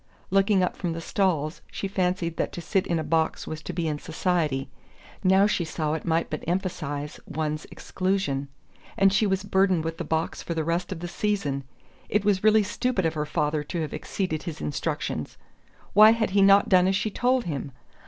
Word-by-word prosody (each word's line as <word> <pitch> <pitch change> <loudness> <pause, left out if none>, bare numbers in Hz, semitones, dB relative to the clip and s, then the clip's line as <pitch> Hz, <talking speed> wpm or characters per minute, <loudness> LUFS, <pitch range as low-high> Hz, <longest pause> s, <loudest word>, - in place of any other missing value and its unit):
Looking 195 0 +4
up 180 - -1
from 175 -3 -3
the 165 - -5
stalls, 165 -3 0
she - - -4
had 195 - -6
fancied 180 -3 0
that - - -1
to - - -5
sit 190 +2 0
in 170 - +1
a 160 - -1
box 160 -1 0
was 155 -1 -6
to - - -5
be 170 -2 -2
in 150 -1 -2
society 160 -5 -1 0.6
now 190 +2 +5
she 205 -4 +1
saw 155 -1 -2
it 160 - -4
might 165 0 +1
but 155 - -5
emphasize 155 -5 -3
one's 155 0 -3
exclusion. 185 -8 -2 0.5
And 195 0 +5
she 210 +1 +3
was 190 0 0
burdened 190 -4 +2
with 165 0 -4
the - - -1
box 160 +1 -2
for 170 - -4
the 160 - 0
rest 170 +3 -1
of 175 -3 -5
the 175 - -4
season! 170 -9 -1 0.4
It 210 -1 +1
was 200 -2 +2
really 215 0 +5
stupid 220 -1 -1
of 160 - +1
her 150 -1 -2
father 150 0 0
to 170 +2 -3
have 155 - -4
exceeded 155 +1 -3
his 165 -4 -6
instructions: 75 - -3 0.6
why 215 +2 +8
had 225 -3 -1
he 200 +1 +3
not 195 +1 +6
done 185 -1 +5
as 190 - +2
she 215 +2 -1
told 250 +3 +1
him?... 145 -5 -4
175 Hz, 205 wpm, -26 LUFS, 155-195 Hz, 0.6 s, why